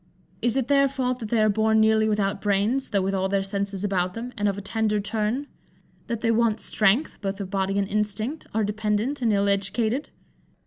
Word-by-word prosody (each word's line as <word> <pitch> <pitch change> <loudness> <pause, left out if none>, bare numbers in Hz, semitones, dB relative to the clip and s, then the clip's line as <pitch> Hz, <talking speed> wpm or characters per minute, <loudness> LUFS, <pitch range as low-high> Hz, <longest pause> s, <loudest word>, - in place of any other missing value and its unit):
Is 240 +1 +1
it 260 -3 0
their 275 -1 +4
fault 255 -2 -2
that 220 -3 -6
they 225 -1 +3
are - - +4
born 220 +1 +3
nearly 220 0 +4
without 200 -2 0
brains, 210 +6 +1
though 200 -3 +1
with 195 +1 -1
all 190 0 0
their 195 0 +1
senses 200 0 -3
about 185 -3 0
them, 240 +2 -6
and 205 -3 0
of 200 -1 -1
a - - -4
tender 210 +1 0
turn? 215 +6 -1 0.6
That 235 -2 -3
they 230 - +2
want 225 -1 +2
strength, 220 +10 +1
both 195 0 -3
of 195 -2 -5
body 195 0 0
and 200 -1 +1
instinct, 215 +8 -2
are 220 0 0
dependant, 215 +6 -1
and 230 -2 +2
ill 200 -1 +2
educated? 220 +6 0
215 Hz, 210 wpm, -25 LUFS, 200-230 Hz, 0.6 s, their